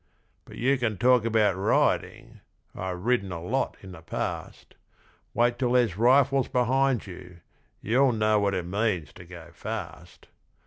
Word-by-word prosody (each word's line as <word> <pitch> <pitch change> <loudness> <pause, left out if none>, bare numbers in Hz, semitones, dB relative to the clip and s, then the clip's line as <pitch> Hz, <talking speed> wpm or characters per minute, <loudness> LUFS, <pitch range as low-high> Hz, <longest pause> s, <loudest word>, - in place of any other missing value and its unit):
But - - -13
you 130 +2 +1
can 110 -5 -1
talk 125 +2 +3
about 110 -3 +2
riding 95 +2 0 0.3
I've 90 0 -6
ridden 120 -6 +1
a 85 - -5
lot 115 +11 -2
in 95 - -10
the 85 -3 -11
past 80 - -6 0.6
Wait 120 0 +1
till 125 -2 0
there's 120 -8 +2
rifles 130 +4 +3
behind 130 0 +1
you, 90 -2 -12 0.4
you'll 130 +5 +3
know 110 -1 +2
what 100 -1 0
it 90 -2 -3
means 95 -5 -2
to 90 - -13
go 85 -2 -12
fast! - - -8
110 Hz, 150 wpm, -26 LUFS, 95-125 Hz, 0.6 s, talk